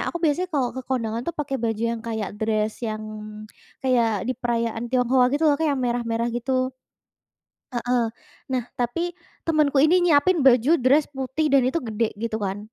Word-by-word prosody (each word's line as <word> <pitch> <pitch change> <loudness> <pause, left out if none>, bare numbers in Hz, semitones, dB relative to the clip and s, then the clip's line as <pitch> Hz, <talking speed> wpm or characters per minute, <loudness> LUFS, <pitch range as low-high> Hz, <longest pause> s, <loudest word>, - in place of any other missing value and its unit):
aku - - -4
biasanya 330 +4 +1
kalau 270 -5 +1
ke - - -2
kondangan 230 -3 -1
tuh 340 - -3
pakai 280 -2 -2
baju 225 -1 -1
yang 230 - -5
kayak 220 -4 -3
dress 215 -1 0
yang, 215 -1 -3 0.8
kayak 230 -6 +2
di - - +2
perayaan 235 -1 -1
Tionghoa 250 +1 +3
gitu 295 +3 +1
loh 290 - +4
Kak 320 - +2
yang 275 - -2
merah-merah, 235 -1 -1
gitu. 255 +1 -1 1.0
Heeh, 245 0 +1 0.5
nah, 255 -1 0 0.2
tapi 335 +9 -1 0.3
temenku 305 -4 +2
ini 310 +4 +5
nyiapin 340 +3 +4
baju 250 +2 +5
dress 280 +4 +4
putih 265 +4 -1
dan 275 -1 +6
itu 265 +6 +1
gede 225 -1 -1 0.2
gitu 230 -1 -1
kan, 195 -1 -3
250 Hz, 170 wpm, -24 LUFS, 230-285 Hz, 1.0 s, dan